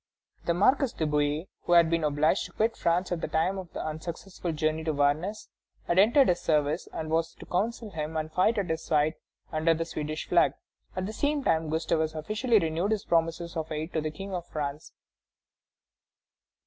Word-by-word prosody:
The 170 - +1
Marquis 255 +7 +3
de 160 - 0
Bouillé, 150 +3 0 0.2
who 175 - +2
had 170 -1 +7
been 165 0 0
obliged 150 +4 +2
to - - -11
quit 225 +1 +1
France 175 +2 0
at 170 -2 -1
the - - -1
time 185 +5 0
of 180 -4 -9
the - - -5
unsuccessful 170 +3 -5
journey 155 0 0
to 160 - +1
Varennes, 150 +9 0 0.4
had 175 - +2
entered 245 +7 +6
his 175 - +2
service 150 +1 +1
and 155 -1 -5
was 165 0 0
to - - -11
counsel 220 +3 -2
him 160 -1 -4
and 155 0 -3
fight 185 +7 +3
at 190 -5 0
his 160 0 -2
side 155 0 +2 0.4
under 165 +1 +2
the 165 +1 -2
Swedish 155 -1 -4
flag. 175 - +4 0.4
At 185 0 -2
the 215 - -5
same 290 +4 0
time 160 -5 +1
Gustavus 160 0 0
officially 215 - +1
renewed 165 +1 0
his 215 -2 -1
promises 165 +1 0
of 160 -1 -3
aid 155 +3 -4
to 160 - 0
the 155 - -2
King 195 +6 -7
of 175 -1 -4
France. 150 -1 -4
165 Hz, 195 wpm, -28 LUFS, 155-185 Hz, 0.4 s, had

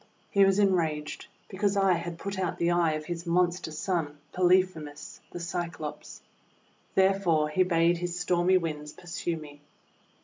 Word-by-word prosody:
He 200 - +5
was 195 0 +3
enraged 165 -7 0 0.2
because 200 +1 0
I 195 -1 +4
had 170 0 -4
put 195 +2 -5
out 185 -2 -1
the 170 0 +1
eye 170 -2 +3
of 155 0 -4
his 170 +1 -5
monster 175 0 +1
son, 155 -2 -2
Polyphemus 180 -5 +1
the 175 - -7
Cyclops. 170 -3 -5 0.7
Therefore 190 -5 +3
he 170 +5 +1
bade 170 -1 +3
his 175 0 -3
stormy 175 +1 +3
Winds 150 -3 -4
pursue 170 -1 -4
me. 145 -2 -11
175 Hz, 145 wpm, -28 LUFS, 160-185 Hz, 0.7 s, He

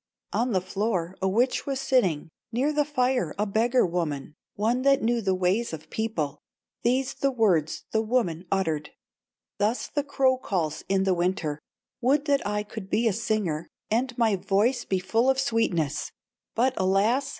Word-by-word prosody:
'" - - -21
On 245 +1 +1
the 190 -3 +2
floor 185 -2 -2
a 190 - +2
witch 240 +9 +1
was 270 -1 -1
sitting, 195 - +1 0.2
Near 265 +6 +1
the 295 -1 +2
fire 255 - 0
a 210 - +1
beggar 230 +5 +2
woman, 155 -5 -2 0.2
One 230 +5 +1
that 275 -1 +3
knew 235 +1 +1
the 190 -3 +1
ways 185 +4 0
of 155 0 -8
people, 160 -11 -2 0.4
These 255 +3 +1
the 275 - 0
words 195 - +1
the 220 - +2
woman 215 -7 -1
uttered: 160 -6 0 0.7
"Thus 215 +4 +1
the 290 - -2
crow 265 -2 +2
calls 165 -10 -2
in 195 0 +2
the 190 -1 +2
winter: 175 -4 -1 0.4
'Would 280 +4 +2
that 280 -2 +2
I 210 0 -1
could 210 -2 -8
be 230 +3 +2
a 220 - +2
singer, 195 -7 -1 0.2
And 240 +2 0
my 225 -4 +3
voice 220 +7 +1
be 190 - 0
full 225 +7 +1
of 265 0 +2
sweetness, 180 - 0 0.4
But, 250 +3 +2
alas! 205 +8 +2
215 Hz, 175 wpm, -26 LUFS, 185-250 Hz, 0.7 s, that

